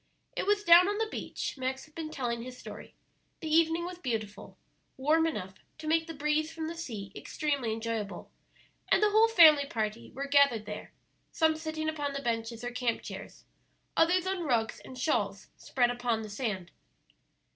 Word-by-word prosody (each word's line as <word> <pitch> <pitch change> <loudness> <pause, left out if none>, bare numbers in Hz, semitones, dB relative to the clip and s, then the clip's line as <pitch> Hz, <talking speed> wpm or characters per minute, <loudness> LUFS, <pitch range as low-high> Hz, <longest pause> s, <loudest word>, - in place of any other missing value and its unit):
It 445 - -2
was 410 0 +3
down 345 0 +8
on 410 0 0
the 445 - +1
beach - - -4
Max 260 +1 -3
had 305 - -23
been 320 -1 -5
telling 240 -6 -3
his 250 +1 -8
story; - - -10 0.4
the 320 - -6
evening 330 +1 +3
was 360 0 -7
beautiful, 220 - -4 0.4
warm 310 +5 +3
enough 190 - -4 0.2
to 315 - -9
make 325 +1 +2
the 330 - -6
breeze 300 +2 0
from 325 0 -5
the 330 - -4
sea 225 - -6
extremely 280 -7 -2
enjoyable, 220 -2 -4 0.6
and 420 - +4
the 420 - +4
whole 440 +2 +6
family 310 -9 +7
party 220 -2 -3
were 275 +2 -3
gathered 280 -6 +4
there, 210 0 -7 0.4
some 320 -1 +3
sitting 315 0 -4
upon 290 -3 -2
the 280 0 -4
benches 230 -1 -2
or 245 - -3
camp 245 -2 -1
chairs, - - -9 0.5
others 355 +2 +3
on 380 -1 -1
rugs 235 -8 0
and 260 - -11
shawls 200 -8 -1
spread 245 -2 +1
upon 240 -2 -1
the 215 - -7
sand. 205 -6 -3
280 Hz, 180 wpm, -30 LUFS, 230-325 Hz, 0.6 s, down